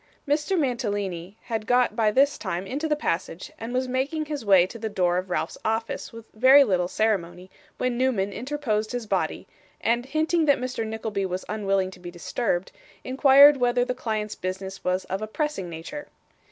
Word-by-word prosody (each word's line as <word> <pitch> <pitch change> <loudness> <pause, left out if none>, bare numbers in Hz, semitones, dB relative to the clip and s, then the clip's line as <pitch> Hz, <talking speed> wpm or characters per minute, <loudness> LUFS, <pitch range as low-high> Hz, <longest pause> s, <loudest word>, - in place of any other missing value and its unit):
Mr. 300 +6 +1
Mantalini 205 - -2
had 220 -2 -4
got 245 -3 +3
by 220 -2 +3
this 275 +6 +3
time 185 -2 -3
into 285 +9 -3
the 300 - +1
passage, 180 - -3
and 225 +1 -5
was 255 +1 0
making 275 +5 -1
his 295 -4 -5
way 190 -4 +6
to 230 +5 -9
the 220 0 -3
door 180 -3 +1
of 185 0 -7
Ralph's - - -2
office 225 +1 -2
with 230 -1 -11
very 260 +5 +7
little 180 -7 +1
ceremony, 185 -3 -1 0.3
when 250 -1 -1
Newman 210 -7 +1
interposed 245 -4 -2
his 245 -2 -3
body; - - -2 0.3
and 240 +2 0
hinting 315 +3 +1
that 285 -2 +4
Mr. 250 -2 -3
Nickleby 220 -3 -3
was 185 0 -4
unwilling 195 -3 0
to 185 - -14
be 175 -1 -8
disturbed, 175 +2 -2 0.3
inquired 275 +2 +7
whether 245 -1 +2
the 250 - -1
client's 215 -4 -3
business 190 +1 -6
was 185 +1 0
of 190 +2 -4
a 215 - -3
pressing 255 - -3
nature. 170 - -7
220 Hz, 180 wpm, -25 LUFS, 190-260 Hz, 0.3 s, very